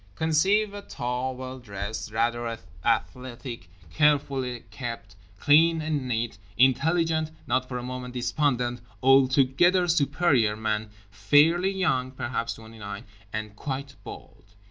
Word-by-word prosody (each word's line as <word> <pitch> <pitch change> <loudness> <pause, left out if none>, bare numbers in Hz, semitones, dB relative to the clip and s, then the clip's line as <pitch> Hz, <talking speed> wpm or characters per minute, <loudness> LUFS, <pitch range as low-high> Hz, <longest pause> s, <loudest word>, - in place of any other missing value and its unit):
Conceive 190 - +2
a 205 - -6
tall, 125 -6 -3
well 130 0 -7
dressed, 105 -1 -6
rather 115 +1 -1 0.3
athletic, 120 -6 -2 0.2
carefully 135 - +1
kept, 115 -6 -7 0.2
clean 165 +3 +5
and 155 -4 -2
neat, 115 -3 -2 0.2
intelligent, 155 +5 +3 0.2
not 130 0 0
for 125 - -3
a 120 - -5
moment 125 0 -6
despondent, 125 -1 0 0.2
altogether 135 +7 +4
superior 140 -8 +2
man, 110 0 -2 0.2
fairly 150 - +4
young 160 -10 0
(perhaps 120 -2 -3
twenty 110 0 -13
nine) 100 +1 -7 0.3
and 110 -1 -5
quite 135 +3 -5
bald. 100 0 -12
130 Hz, 120 wpm, -26 LUFS, 115-150 Hz, 0.3 s, clean